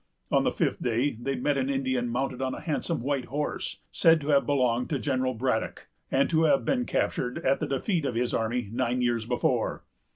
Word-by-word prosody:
On - - +4
the - - +2
fifth - - -1
day, 120 +4 +1
they 135 +2 -1
met 140 +2 0
an 130 +1 -1
Indian 130 -3 0
mounted 130 +2 -2
on 130 -1 -1
a - - -7
handsome 160 -1 -2
white 140 -1 -1
horse, 145 +3 -3
said 165 -1 +5
to 145 - -5
have 140 -2 +4
belonged 125 -4 +1
to 145 - 0
General 130 -2 -1
Braddock, 115 -1 -2 0.2
and 135 +1 +3
to 160 0 +4
have 140 -3 +3
been 250 -2 +1
captured 125 -1 -1
at 135 +1 +3
the - - -2
defeat 160 - 0
of 125 - -2
his 120 +1 0
army, 115 0 -1
nine 125 +1 0
years 120 -2 0
before. 125 0 0
130 Hz, 205 wpm, -27 LUFS, 125-140 Hz, 0.2 s, said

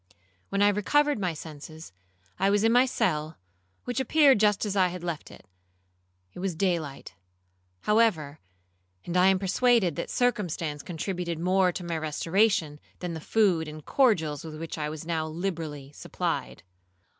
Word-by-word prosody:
When 200 +1 +1
I 205 - +6
recovered 290 +7 +2
my 180 -4 -1
senses, 155 - -10 0.5
I 195 - +3
was 205 +1 +2
in 225 - +4
my 250 +2 +5
cell, 155 -9 -1 0.5
which 245 +1 -3
appeared 275 -2 +4
just 210 0 +2
as 205 -1 -2
I 185 -2 +4
had 180 0 -7
left 170 -3 -4
it; - - -15 0.9
it - - -10
was 185 -2 -2
day 180 0 +1
light, 145 -3 -9 0.7
however; 175 -10 +1 0.7
and 175 - -4
I 180 +1 +5
am 190 0 +4
persuaded 195 - +2
that - - -4
circumstance 175 -11 -1
contributed 175 0 -4
more 185 +2 +2
to 180 - -5
my 170 -2 -3
restoration, 160 0 +1 0.2
than 175 -2 -5
the 160 - -6
food 180 -5 +2
and 155 -1 -9
cordials 165 - +2
with 155 -1 -8
which 165 0 -5
I 150 -1 -3
was 155 0 -7
now 160 -2 -1
liberally 155 -5 -5
supplied. - - -4
175 Hz, 160 wpm, -27 LUFS, 155-205 Hz, 0.9 s, I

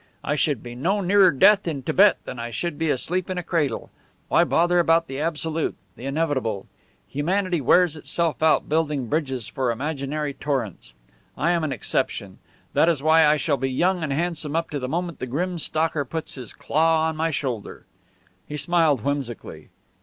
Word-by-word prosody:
I 145 - 0
should 145 -4 0
be 120 -1 -8
no 175 +12 0
nearer 195 0 +5
death 195 +6 +5
in 145 -5 -3
Tibet 200 +9 +5
than 125 - -7
I 115 0 -4
should 150 +7 -4
be 160 -1 0
asleep 175 +8 -1
in 185 - -3
a 180 - -2
cradle. 150 -9 -1 0.4
Why - - +5
bother 175 +1 +2
about 165 0 +3
the 135 -3 -6
absolute, 160 0 -1 0.2
the 130 - -7
inevitable? 135 -9 -1 0.4
Humanity 175 +3 0
wears 175 +5 +4
itself 165 +1 -1
out 160 0 +3
building 150 -4 0
bridges 135 -7 -2
for 130 -2 -2
imaginary 140 +3 -3
torrents. 120 - -4 0.4
I 170 - +2
am 170 -2 +1
an 155 - -1
exception; 125 - -2 0.3
that 165 - +4
is 150 -5 0
why 160 0 +5
I 150 +1 +4
shall 145 -1 0
be 135 +1 -1
young 175 +7 +1
and 155 -3 -2
handsome 155 0 -2
up 165 0 -1
to 145 - -2
the 130 -1 -4
moment 170 +2 -3
the 130 - -4
grim 175 +7 -2
stalker 155 -1 0
puts 160 +4 -5
his 125 -5 -6
claw 160 +1 +1
on 160 - -2
my 160 +1 0
shoulder." 130 -8 -4 0.6
He 150 - -5
smiled 160 -6 +2
whimsically. 135 -3 -4
155 Hz, 185 wpm, -24 LUFS, 135-170 Hz, 0.6 s, nearer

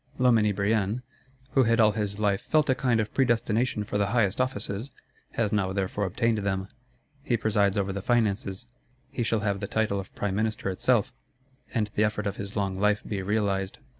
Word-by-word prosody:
Loménie 115 -5 +4
Brienne, 105 +3 0 0.5
who 135 - +4
had 115 +1 +2
all 110 -1 +6
his 105 -1 -2
life 100 -2 +1
"felt 155 -3 +2
a - - +5
kind 125 -2 +1
of 110 0 -2
predestination 120 -3 +1
for 105 0 -2
the 100 - +2
highest 110 0 +1
offices," 110 -1 -2 0.4
has 110 -3 0
now 100 -3 +1
therefore 100 +1 -1
obtained 110 +4 +1
them. 95 -1 -2 0.5
He 120 -3 0
presides 100 -3 +1
over 100 -1 0
the 100 - -4
Finances; 105 -2 0 0.5
he - - -3
shall 115 -2 +1
have 100 -2 0
the - - -4
title 110 -3 0
of 95 - -9
Prime 100 -2 -2
Minister 110 -2 -1
itself, 125 +5 +1 0.6
and 105 -3 -1
the 105 - +2
effort 105 0 0
of 100 -1 -2
his 100 0 -6
long 95 -2 -1
life 105 +1 +2
be 100 -3 -2
realised. 100 -1 -1
105 Hz, 190 wpm, -27 LUFS, 100-115 Hz, 0.6 s, all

